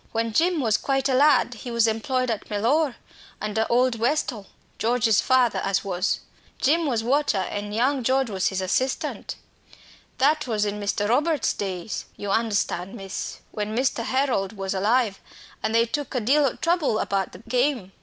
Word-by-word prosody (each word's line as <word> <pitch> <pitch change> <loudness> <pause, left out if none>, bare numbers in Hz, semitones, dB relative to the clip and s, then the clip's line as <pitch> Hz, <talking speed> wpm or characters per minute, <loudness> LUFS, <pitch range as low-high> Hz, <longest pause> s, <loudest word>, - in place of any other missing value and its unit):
When 225 0 -1
Jim 335 +4 +2
was 220 -4 +2
quite 270 -1 0
a 265 - +1
lad 270 -2 +4
he 250 - -7
was 235 -1 +2
employed 255 +3 0
at 220 - -5
Mellor, 245 +7 +1 0.4
under 215 +1 -1
old 245 -1 +2
Westall, 235 -5 -1 0.3
George's 230 -2 +3
father 250 -6 +3
as 195 0 0
was. 185 -1 -1 0.4
Jim 320 +3 +2
was 235 -5 0
'watcher,' 270 -2 +2
and 205 0 -4
young 255 +5 +1
George 260 +1 +1
he - - -6
was 190 0 0
assistant. 255 +8 -2 0.8
That 300 +1 +2
was 215 -3 0
in 205 0 -3
Mr. 205 0 -1
Robert's 295 +7 +2
days, 190 0 -4
you 205 -1 -4
understand, 200 -4 0
miss 195 -1 -6
when 210 +1 -3
Master 255 -1 +1
Harold 255 -5 0
was 195 0 -2
alive; 210 +1 +1 0.4
and 220 - -1
they 230 0 +5
took 285 +3 -4
a - - +2
deal 280 +6 +3
o' 250 - -3
trouble 335 -9 +1
about 195 -3 -1
the 210 - -13
game. 245 -5 0
230 Hz, 170 wpm, -24 LUFS, 205-265 Hz, 0.8 s, they